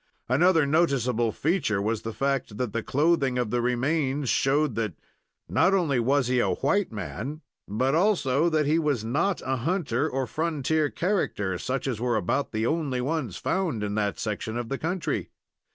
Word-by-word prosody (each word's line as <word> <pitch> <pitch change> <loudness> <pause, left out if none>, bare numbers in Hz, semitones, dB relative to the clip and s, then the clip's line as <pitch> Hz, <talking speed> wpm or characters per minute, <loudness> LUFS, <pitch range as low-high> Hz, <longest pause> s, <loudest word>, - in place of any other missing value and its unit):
Another 160 +4 +4
noticeable 130 -7 +2
feature 150 - 0
was 110 +2 -1
the 115 - -4
fact 135 -4 -2
that 125 -3 -2
the 115 - -1
clothing 145 -2 +1
of 120 -4 -1
the 120 - +1
remains 135 +2 0
showed 145 0 +2
that 110 -6 -2 0.5
not 195 +1 +3
only 155 -9 +1
was 135 +3 +2
he 125 +1 +1
a - - +2
white 185 +6 +1
man, 115 - -5 0.3
but 130 +7 0
also 165 -5 +2
that 155 -2 +1
he 155 +3 +3
was 145 -8 0
not 165 - 0
a 130 0 0
hunter 145 -3 0
or 130 0 -1
frontier 155 +1 0
character, 105 - -1
such 130 0 -2
as 120 -5 -2
were 120 -2 +1
about 110 +8 -1
the 110 0 -1
only 145 -3 0
ones 130 - -2
found 165 - -1
in 105 0 -2
that 105 -1 -1
section 110 +1 -3
of 120 -1 -4
the 135 - -3
country. 175 +1 -2
135 Hz, 175 wpm, -26 LUFS, 115-160 Hz, 0.5 s, Another